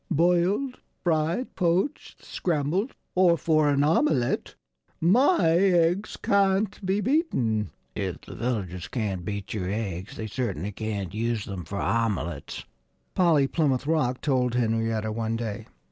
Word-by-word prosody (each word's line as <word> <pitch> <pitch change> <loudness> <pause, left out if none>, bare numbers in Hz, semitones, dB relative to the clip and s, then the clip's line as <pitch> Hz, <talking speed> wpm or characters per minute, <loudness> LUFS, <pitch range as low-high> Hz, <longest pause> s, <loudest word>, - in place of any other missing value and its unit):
"Boiled, 180 - +2 0.2
fried, 165 +7 0
poached, 180 +8 -1
scrambled, 175 - -1 0.2
or 180 -2 +4
for 155 0 +2
an 140 0 +3
omelette 150 -4 +1 0.4
my 225 - +4
eggs 180 +1 +2
can't 200 +1 +1
be 190 +2 +1
beaten." 130 - +1 0.2
"If - - -4
the - - -11
villagers 95 -8 -3
can't 100 -7 -3
beat 100 0 -4
your 95 -4 -2
eggs 100 -3 -4
they 110 - -4
certainly 105 - -3
can't 100 -3 -4
use 115 0 -1
them 95 -4 -6
for 100 +5 -5
omelettes," 105 -8 -2 0.5
Polly 165 -6 +4
Plymouth 135 -3 0
Rock 135 -5 +1
told 125 -4 +1
Henrietta 115 -2 0
one 115 +1 -2
day. 115 -3 -4
130 Hz, 130 wpm, -26 LUFS, 110-175 Hz, 0.5 s, or